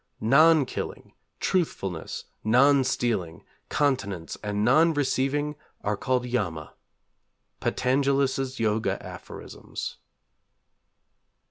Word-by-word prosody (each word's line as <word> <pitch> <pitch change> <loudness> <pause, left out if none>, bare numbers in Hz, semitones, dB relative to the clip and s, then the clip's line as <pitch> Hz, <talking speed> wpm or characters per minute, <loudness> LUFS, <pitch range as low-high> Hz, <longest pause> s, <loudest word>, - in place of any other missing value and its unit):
_ - - -47 0.2
'Non 150 +6 +5
killing, - - -6 0.3
truthfulness, 95 - -2 0.2
non 135 +5 +5
stealing, 115 -10 -1 0.3
continence, 105 - -1
and 105 0 -1
non 155 +6 +5
receiving, 145 +1 0 0.3
are 105 +1 0
called 125 +3 0
Yama.' 90 -11 -3 0.9
_Patanjalis' 135 0 +1
Yoga 110 -1 0
Aphorisms. - - -8
130 Hz, 85 wpm, -26 LUFS, 105-140 Hz, 0.9 s, Non